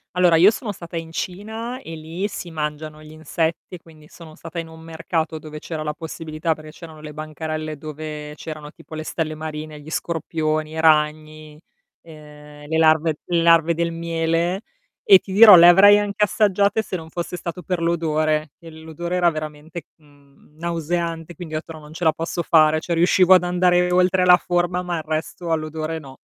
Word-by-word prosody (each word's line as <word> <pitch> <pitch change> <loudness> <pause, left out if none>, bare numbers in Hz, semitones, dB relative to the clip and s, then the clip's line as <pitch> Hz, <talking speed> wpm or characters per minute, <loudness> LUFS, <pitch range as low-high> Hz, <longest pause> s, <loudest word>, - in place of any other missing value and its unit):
Allora, 175 -2 +4
io 185 +5 +7
sono 220 -1 -4
stata 170 -3 -8
in 165 0 -6
Cina 220 +8 -5
e 165 - -8
lì 165 +6 -4
si 180 -3 -7
mangiano 155 0 -5
gli 155 - -13
insetti, 160 +3 -3
quindi 155 -2 -18
sono 160 -2 -13
stata 165 +1 -10
in 165 -1 -4
un 160 0 -13
mercato 160 0 -3
dove 155 0 -9
c'era 155 -1 -6
la 150 0 -3
possibilità 160 0 -4
perché 155 0 -12
c'erano 160 -1 -12
le 150 -1 -9
bancarelle 155 0 -5
dove 150 0 -7
c'erano 155 -1 -8
tipo 160 - -13
le 155 - -5
stelle 155 -1 -3
marine, 155 -1 -7
gli 155 +2 -12
scorpioni, 155 -2 -2
i 160 - -5
ragni, 155 0 0 0.4
ehm, 150 -2 -14
le 160 +1 -1
larve 160 0 +3
le 170 -1 0
larve 165 -1 +4
del 170 0 -1
miele. 165 +3 -1 0.5
E 190 - +12
ti 190 - -11
dirò 210 0 +9
le 170 0 +8
avrei 200 +3 +8
anche 205 0 -1
assaggiate 205 0 +2
se 195 - -6
non 160 -2 -7
fosse 175 +1 -5
stato 175 +1 -6
per 180 0 -2
l'odore, 155 -3 0
che 165 -1 -12
l'odore 160 +3 -6
era 175 -1 +3
veramente, 155 +1 -7
mhmm, 145 -1 -25
nauseante 170 0 -3
quindi 160 -2 -9
ho - - 0
detto: 165 - -11
"No 155 - -10
non 150 +1 -13
ce 175 - -7
la 160 -1 +4
posso 165 +2 -4
fare", 155 -2 +4
cioè 170 +1 -3
riuscivo 185 +2 +5
ad 180 - +3
andare 180 0 +2
oltre 180 0 +3
la 180 0 +7
forma, 175 0 -1
ma 175 -2 -3
il 155 - -5
resto 160 +2 -4
all'odore 155 0 -3
no. 135 -3 -13
160 Hz, 190 wpm, -21 LUFS, 155-175 Hz, 0.5 s, E